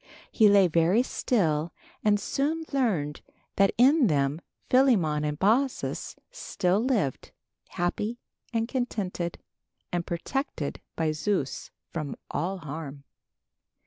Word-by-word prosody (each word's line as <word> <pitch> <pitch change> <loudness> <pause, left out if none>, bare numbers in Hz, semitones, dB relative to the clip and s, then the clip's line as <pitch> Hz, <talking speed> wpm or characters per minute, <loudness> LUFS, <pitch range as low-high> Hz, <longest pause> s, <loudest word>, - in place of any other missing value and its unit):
He 215 -3 +5
lay 200 -2 +6
very 170 +8 +3
still 165 -12 0 0.3
and 210 -1 +3
soon 305 +9 -1
learned 185 - 0 0.4
that 195 -1 +5
in 265 +2 +5
them 145 -1 +1 0.3
Philemon 200 - +3
and 150 0 -2
Baucis 240 - 0 0.2
still 190 - 0
lived, 220 - 0 0.4
happy 210 +6 -2 0.3
and 230 -1 0
contented, 205 -9 -3 0.5
and 175 -1 -1
protected 170 - -3
by 160 -1 +1
Zeus 155 -4 -2 0.2
from 155 -4 -4 0.2
all 185 +6 -2
harm. 150 -3 -7
185 Hz, 110 wpm, -27 LUFS, 155-240 Hz, 0.5 s, lay